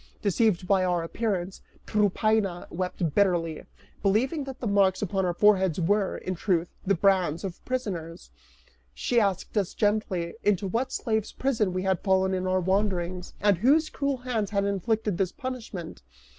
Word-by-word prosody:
Deceived 200 -2 +2
by 190 -1 +3
our 175 -2 +1
appearance, 190 0 -3 0.2
Tryphaena 210 -2 +1
wept 180 -3 -2
bitterly, 170 -5 +1 0.4
believing 255 +9 +1
that 270 -1 -8
the - - -5
marks 200 -2 +2
upon 190 -1 0
our 175 - 0
foreheads 190 -5 +3
were, 195 +3 +1
in 185 - -4
truth, 175 -2 -1
the 195 +1 +2
brands 180 -3 +2
of 190 -3 -6
prisoners: 185 -10 -4 0.6
she 240 - +1
asked 195 -2 -1
us 195 - -3
gently, 205 -5 0
into 205 -1 +2
what 240 +7 -1
slave's 220 -4 -1
prison 225 -8 0
we 185 +1 -2
had 190 -2 +1
fallen 190 -1 +2
in 185 0 -1
our 185 0 +2
wanderings, 185 -2 -1
and 200 -3 +3
whose 305 - +3
cruel 280 -1 -1
hands 240 -5 -2
had 200 -1 0
inflicted 205 0 -1
this 190 -2 +1
punishment. 230 - -6
195 Hz, 155 wpm, -27 LUFS, 180-215 Hz, 0.6 s, by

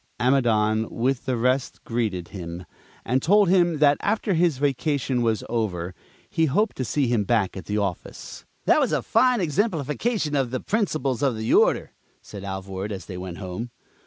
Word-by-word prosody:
Amidon, 110 -4 +2
with 125 +2 -1
the 130 -2 0
rest, 125 +3 0
greeted 105 -7 -2
him, 90 -2 -7 0.4
and 130 +2 +1
told 200 +4 +4
him 175 -3 +3
that 145 -1 +4
after 210 -1 0
his 170 -4 +2
vacation 140 -2 0
was 115 -2 0
over, 95 -7 -2 0.3
he 160 0 +1
hoped 205 +10 +1
to 130 - -1
see 135 +5 0
him 120 -3 +1
back 105 -2 +1
at 95 -4 -7
the 105 +4 -2
office. 100 -4 -4 0.2
"That - - +5
was - - +1
a - - 0
fine 250 -2 +3
exemplification 165 - 0
of 135 -3 +1
the 130 +1 -2
principles 155 - -1
of 135 -5 +1
the 110 +1 -1
Order," - - +3 0.3
said 100 -2 -10
Alvord 95 +1 -5
as 95 -5 -6
they 90 - -8
went 90 -2 -6
home. 95 +5 -5
125 Hz, 175 wpm, -24 LUFS, 105-150 Hz, 0.4 s, That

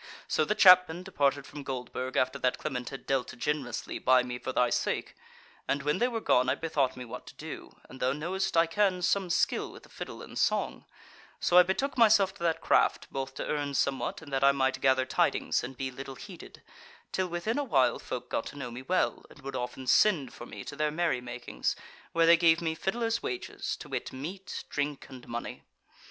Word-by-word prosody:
So 155 - +2
the 210 - 0
Chapmen 180 -3 +7
departed 140 -7 0
from 145 - -9
Goldburg 130 -1 -4
after 130 +2 +1
that 125 -1 +1
Clement 125 -5 -4
had 135 - -9
dealt 130 -2 -1
generously 125 -1 -3
by 130 -1 +4
me 125 -1 -5
for 130 - -4
thy 125 -1 +2
sake; - - -1 0.5
and 140 0 0
when 150 +1 +1
they 245 - +3
were 235 -2 -2
gone 125 - +3
I - - +2
bethought 145 -6 0
me 125 - -6
what 115 - -9
to - - -11
do, - - -8
and 130 - -12
thou 130 - +2
knowest 170 +6 -2
I 165 - +6
can 185 +1 +1
some 195 0 +1
skill - - +1
with - - -13
the - - -17
fiddle - - -8
and - - -7
song, - - 0 0.5
so 175 - +5
I - - +11
betook 245 +9 -1
myself 210 -4 +5
to 205 - -18
that 165 -1 0
craft, - - +2
both 135 0 -4
to - - -4
earn 145 -2 -2
somewhat 140 +3 -1
and 145 -3 -11
that 135 0 +1
I 140 - +7
might 135 -1 0
gather 130 -1 +3
tidings 130 - +1
and 125 +1 -7
be 130 -1 -3
little 135 +1 -8
heeded, 185 +2 -11 0.5
till 185 -1 0
within 180 +9 -2
awhile 135 - +2
folk - - -5
got - - -2
to - - -9
know 125 -4 -5
me 120 +2 -7
well, 180 +8 0
and 150 - -16
would 135 +1 -6
often 125 +1 -4
send 155 -1 +3
for 120 - -9
me - - -8
to 145 - -8
their 150 +1 +1
merry 155 -5 0
makings, 120 0 -3 0.4
where 165 0 +3
they 170 +1 +7
gave 165 -1 +5
me 160 -1 -1
fiddler's 230 +7 -1
wages, 125 -1 -4
to - - -11
wit, - - -3
meat, 175 +9 -6
drink, 145 -1 -2
and 130 -2 -11
money. 120 0 -5
145 Hz, 210 wpm, -29 LUFS, 130-180 Hz, 0.5 s, I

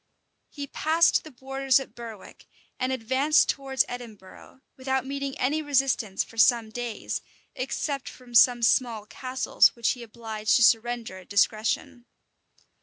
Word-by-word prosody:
He 285 -1 -7
passed 320 +4 +2
the 315 - -11
borders 270 0 0
at 270 - -9
Berwick, 230 -4 -11 0.3
and 255 0 -1
advanced 260 +5 +2
towards 270 -2 0
Edinburgh, 235 0 -11
without 265 0 -2
meeting 275 0 -4
any 295 +5 0
resistance 270 -8 0
for 225 - -11
some 230 -1 +4
days, 240 -2 -4 0.3
except 270 +1 -3
from 250 -1 -15
some 240 +1 +5
small 230 -3 +2
castles, 255 +4 +1
which 235 -2 +1
he 250 - -6
obliged 220 -2 -2
to 240 - +4
surrender 230 -3 +2
at 185 - -17
discretion. 215 +4 0
245 Hz, 135 wpm, -26 LUFS, 225-270 Hz, 0.3 s, some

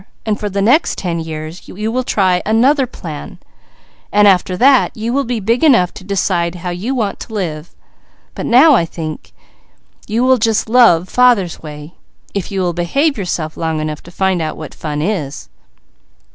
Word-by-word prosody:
For 210 0 -4
the 200 0 -1
next 265 +10 +3
ten 170 -3 -2
years 160 +1 -7
you 215 +3 -4
will 255 +2 -1
try 185 -6 +1
another 255 +6 +2
plan; 160 -10 -8 0.7
after 195 -3 +3
that, 265 +1 +4
you 225 +2 -2
will 280 +1 0
be 240 -1 -2
big 230 +7 0
enough 235 - +4
to - - -11
decide 185 -3 -1
how 180 - -1
you 210 +10 -3
want 215 -5 -2
to 220 - -8
live; 165 -5 -4 0.6
but - - -5
now 270 +6 +6
I 235 - +4
think 160 -2 -7 0.8
you 225 +3 0
will 260 0 +4
just 225 0 +1
love 220 -8 +4
father's 240 -9 +2
way, 150 +1 -9 0.4
if 200 -1 -4
you 195 -1 -1
will 175 -1 0
behave 275 - 0
yourself 175 -6 -3
long 160 -1 -2
enough 155 -1 -4
to - - -14
find 190 -1 0
out 155 -1 -3
what 155 - -8
fun 150 -1 -4
it 185 - +1
is." 150 -9 -5
190 Hz, 175 wpm, -16 LUFS, 165-235 Hz, 0.8 s, now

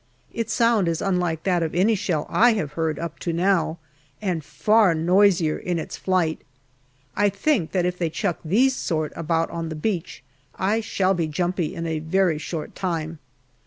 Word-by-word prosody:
Its 230 -1 -3
sound 230 -6 +3
is 165 -1 0
unlike 180 -4 -1
that 180 -3 +1
of 160 -1 -2
any 195 +6 +3
shell 185 -7 -1
I 240 +1 +4
have 155 -9 -2
heard 160 -1 -1
up 170 -1 -6
to 170 - -2
now, 170 -1 +1 0.4
and 180 -6 -2
far 185 +6 +3
noisier 175 -1 +3
in 175 -1 -2
its 160 - -5
flight; 180 -4 0 0.7
I 205 0 +3
think 200 - 0
that 180 -2 +1
if 180 0 -2
they 170 -2 0
chuck 175 +2 -2
these 245 +11 +3
sort 155 - -2
about 165 0 -1
on 165 -1 -4
the 160 - -5
beach 170 -3 -3 0.3
I 210 +4 0
shall 195 -3 +1
be 170 -3 -1
jumpy 175 +2 -2
in 165 -1 -4
a 160 -1 -2
very 165 0 +1
short 155 0 -5
time. 165 -4 -3
175 Hz, 180 wpm, -23 LUFS, 160-195 Hz, 0.7 s, I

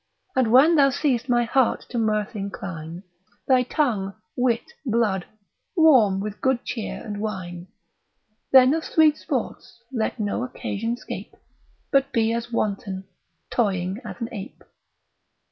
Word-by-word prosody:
And 250 -4 +2
when 300 +7 +6
thou 275 -1 +6
seest 270 -3 0
my 240 -1 +3
heart 245 +1 +1
to 240 - -2
mirth 215 -1 0
incline, 190 -5 -6 0.4
Thy 255 -1 +5
tongue, 230 -8 -1 0.2
wit, 245 -2 0
blood, 220 -7 0 0.5
warm 255 - +5
with 210 +1 -5
good 260 -2 +1
cheer 225 -4 -4
and 205 -1 -5
wine: 180 -4 -5 0.8
Then 260 +1 +7
of 320 0 -1
sweet 310 -2 +4
sports - - -4 0.2
let 230 0 -1
no 210 +3 -1
occasion 230 -2 -3
scape, - - -8 0.6
But 275 0 +3
be 230 -3 +2
as 235 +1 -3
wanton, 200 -3 -2 0.5
toying 190 -3 0
as - - -7
an 230 -1 -3
ape. 205 -2 -8
230 Hz, 135 wpm, -24 LUFS, 200-255 Hz, 0.8 s, Then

